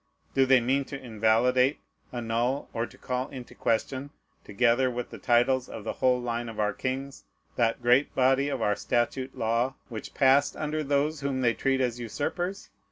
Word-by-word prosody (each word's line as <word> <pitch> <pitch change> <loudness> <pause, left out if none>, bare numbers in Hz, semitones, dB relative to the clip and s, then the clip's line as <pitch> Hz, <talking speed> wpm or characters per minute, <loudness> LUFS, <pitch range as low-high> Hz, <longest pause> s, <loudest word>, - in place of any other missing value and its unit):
Do 135 -1 +3
they 130 -1 +6
mean 130 +4 +1
to 140 0 -7
invalidate, 125 +3 +2 0.3
annul, 120 +3 -1
or 115 0 -1
to - - -17
call 125 0 -3
into 130 -3 -9
question, 130 +4 -1 0.3
together 120 +4 +2
with 125 -1 -5
the - - -9
titles 125 +1 +2
of - - -7
the 110 - -3
whole 125 -1 +2
line 120 -1 -3
of 110 - -8
our 105 0 +1
kings, 135 +1 -4 0.3
that 115 0 +1
great 125 +4 +3
body 135 +2 +3
of 135 -5 -2
our 105 - +2
statute 130 +4 -1
law 120 +3 0
which 110 -3 -7
passed 135 +1 +4
under 155 0 -2
those 145 +2 0
whom 135 -2 -1
they 120 -2 +3
treat 135 +1 0
as 125 -1 -1
usurpers? 175 - -4
125 Hz, 175 wpm, -27 LUFS, 120-135 Hz, 0.3 s, they